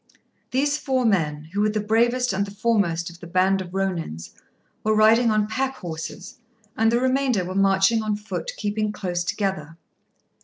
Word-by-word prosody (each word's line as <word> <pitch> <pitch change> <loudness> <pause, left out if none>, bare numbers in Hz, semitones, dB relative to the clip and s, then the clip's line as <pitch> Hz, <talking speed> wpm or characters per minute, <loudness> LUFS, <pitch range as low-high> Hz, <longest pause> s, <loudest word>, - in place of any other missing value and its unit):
These 285 +3 +1
four 260 -3 0
men, 155 -7 0
who 205 - 0
were 215 - +3
the 215 0 -1
bravest 235 +3 +1
and 200 +1 -1
the 200 - -10
foremost 195 -7 0
of 170 - -15
the 170 - -10
band 190 +2 +2
of 180 - -7
Rônins, 175 - -3 0.5
were 215 0 +2
riding 225 +2 +5
on 215 -1 +2
pack 265 +5 -2
horses, 175 +1 -7 0.4
and 225 0 +3
the 235 - +2
remainder 260 -6 +1
were 185 - -5
marching 195 +3 +3
on 215 -1 -1
foot, 210 - -5
keeping 210 0 -1
close 180 -4 -3
together. 175 -5 -3
205 Hz, 175 wpm, -23 LUFS, 185-230 Hz, 0.5 s, riding